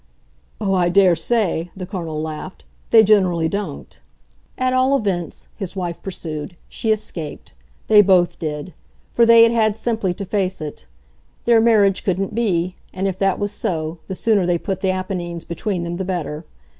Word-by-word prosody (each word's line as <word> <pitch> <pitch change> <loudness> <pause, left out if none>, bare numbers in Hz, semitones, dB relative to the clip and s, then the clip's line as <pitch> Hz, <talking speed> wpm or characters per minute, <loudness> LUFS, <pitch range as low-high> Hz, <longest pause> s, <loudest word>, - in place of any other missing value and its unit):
"Oh, 200 -3 0
I 180 -2 +2
daresay," 180 0 +2
the 185 - -5
Colonel 170 -5 -5
laughed. 160 +4 -7 0.2
"They 225 -1 +7
generally 185 -6 +3
don't!" 195 -5 -5 0.6
"At 255 0 +1
all 260 +2 +3
events," 185 -7 -3
his 195 -3 -6
wife 175 -3 -4
pursued, 165 -3 -6
"she 220 - -2
escaped 170 -8 -5 0.3
they 210 -1 +8
both 185 -3 +3
did; 155 +2 -5 0.4
for 235 -1 +4
they 230 0 +8
had 230 - +5
had 220 -2 +2
simply 220 -6 -1
to 200 - -5
face 190 -1 -1
it. 150 - -8 0.6
Their 235 -1 +5
marriage 210 -4 +3
couldn't 195 +1 -1
be, 185 -6 0 0.2
and, 190 +1 -2
if 190 0 -3
that 195 -1 +2
was 205 0 -2
so, 160 -3 -3
the 190 - -4
sooner 205 -3 +2
they 175 -1 +2
put 190 +2 -4
the 190 - +1
Apennines 180 -3 -3
between 175 +2 -3
them 170 0 -4
the 190 - -2
better. 170 -4 -4
190 Hz, 170 wpm, -20 LUFS, 170-210 Hz, 0.6 s, they